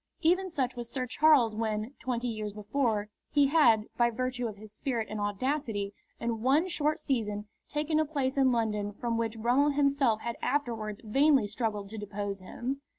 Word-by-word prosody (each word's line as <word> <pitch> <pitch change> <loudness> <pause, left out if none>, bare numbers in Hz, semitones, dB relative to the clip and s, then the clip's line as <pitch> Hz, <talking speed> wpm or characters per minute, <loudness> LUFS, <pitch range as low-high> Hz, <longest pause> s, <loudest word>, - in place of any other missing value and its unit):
Even 365 +3 +3
such 265 -7 -1
was 240 -1 -6
Sir 255 +1 -2
Charles 255 -4 +4
when, 220 +2 -2
twenty 245 0 -2
years 215 -3 -4
before, 215 0 -1 0.2
he 285 -1 +4
had, 240 -9 +5
by 240 0 +4
virtue 250 +1 -2
of 215 - -6
his 215 0 -12
spirit 230 -1 -2
and 215 -1 -3
audacity, 205 -1 -1 0.3
in 230 -1 -2
one 280 +8 +3
short 310 -3 +1
season 215 -9 -2 0.2
taken 305 +1 0
a 315 - +3
place 280 -3 -1
in 265 -2 +4
London 210 -3 0
from 235 +2 -2
which 230 -1 -1
Brummell 245 +6 +3
himself 275 -6 +2
had 235 0 -4
afterwards 230 -7 -2
vainly 270 +2 +4
struggled 210 -1 -2
to 220 +1 -6
depose 205 -1 -4
him. 250 +9 -5
235 Hz, 175 wpm, -30 LUFS, 215-280 Hz, 0.3 s, had